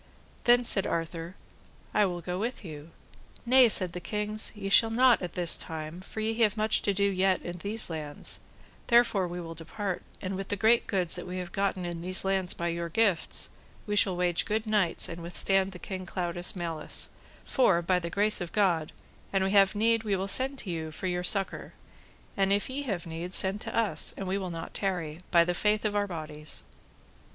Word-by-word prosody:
Then 245 0 +5
said 195 -4 +2
Arthur, 165 +1 -4 0.6
I 205 - +4
will 175 -1 -4
go 180 +2 -4
with 230 0 -4
you. 155 -1 -9 0.6
Nay, 255 0 +6
said 185 -5 +6
the 180 - -4
kings, 210 +4 -2
ye 200 -2 -5
shall 225 +3 +5
not 245 +2 +4
at 180 - -5
this 175 -2 +2
time, 160 +2 -6
for 215 +3 -6
ye 220 +1 0
have 215 -1 +3
much 215 0 +1
to 205 - +1
do 200 +1 0
yet 190 -1 +1
in 175 0 -6
these 215 +4 +1
lands, 150 -3 -2 0.5
therefore 235 -6 +4
we 175 +1 -6
will 165 -1 -7
depart, 180 +4 -5 0.2
and 190 0 -4
with 195 0 -5
the 205 - -2
great 225 +4 +3
goods 180 -4 0
that 180 - -6
we 180 +1 -5
have 180 -1 -5
gotten 195 -2 -1
in 170 -1 -5
these 185 +2 +1
lands 190 -2 0
by 170 0 -2
your 170 0 -3
gifts, 200 -1 0 0.4
we 210 - -2
shall 195 -3 +3
wage 175 -1 0
good 215 +1 -1
knights 210 -5 +1
and 170 0 -7
withstand 190 +3 +1
the 185 - -9
King 185 0 -6
Claudas' 175 0 -2
malice, 165 -3 -2 0.4
for 190 -10 +3
by 180 +1 +2
the 170 -1 -5
grace 205 +3 +2
of 175 - -5
God, 175 -7 +1 0.4
an 195 -1 +1
we 190 - 0
have 200 0 +5
need 225 +2 +3
we 205 -3 0
will 190 +1 -2
send 265 +6 +1
to 195 - -6
you 160 -2 -4
for 185 - -7
your 180 -1 -1
succour; 195 +1 0 0.6
and 195 0 +1
if 200 +5 0
ye 275 +2 -3
have 195 -10 -3
need, 170 +2 -1
send 195 +2 +3
for - - -5
us, 225 -3 +1
and 195 - -5
we 195 +2 -1
will 185 -2 -4
not 165 -1 -7
tarry, 175 -5 -2
by 170 -2 +5
the 175 - 0
faith 210 +4 +1
of 210 -1 0
our 205 0 +1
bodies. 155 -3 -3
190 Hz, 210 wpm, -28 LUFS, 175-210 Hz, 0.6 s, Nay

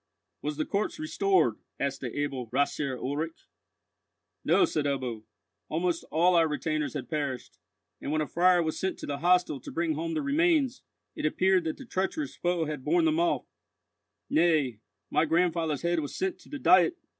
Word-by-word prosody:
"Was 150 0 -3
the 155 - 0
corpse 200 +2 -1
restored?" 160 - +1 0.2
asked 140 0 -2
the 125 -1 -5
able 135 -4 -2
Rathsherr 140 +1 0
Ulrich. 150 +6 -4 1.0
"No," 375 - +4
said 155 - -1
Ebbo. 125 -6 -2 0.4
"Almost 170 +1 -1
all 175 +3 +3
our 165 -2 +5
retainers 155 0 -2
had 130 -4 -4
perished, 140 -4 -4 0.4
and - - -3
when 155 - +1
a 155 - +1
friar 175 +3 +3
was 160 -1 -2
sent 190 0 -2
to - - -7
the 140 -1 -4
hostel 175 -4 +3
to - - -9
bring 165 -1 0
home 165 +2 -3
the - - -1
remains, 290 -2 +2 0.3
it - - 0
appeared 185 +2 +2
that 160 - -2
the 270 - -10
treacherous 240 - -2
foe 175 -2 0
had 150 -3 -5
borne 340 - +3
them 320 0 +2
off—nay, 160 - -1 0.3
my - - +3
grandfather's 165 -2 +1
head 170 0 +1
was 145 -3 -5
sent 380 -1 -2
to - - -18
the 295 - -5
Diet!" 190 - +5
160 Hz, 175 wpm, -28 LUFS, 145-185 Hz, 1.0 s, our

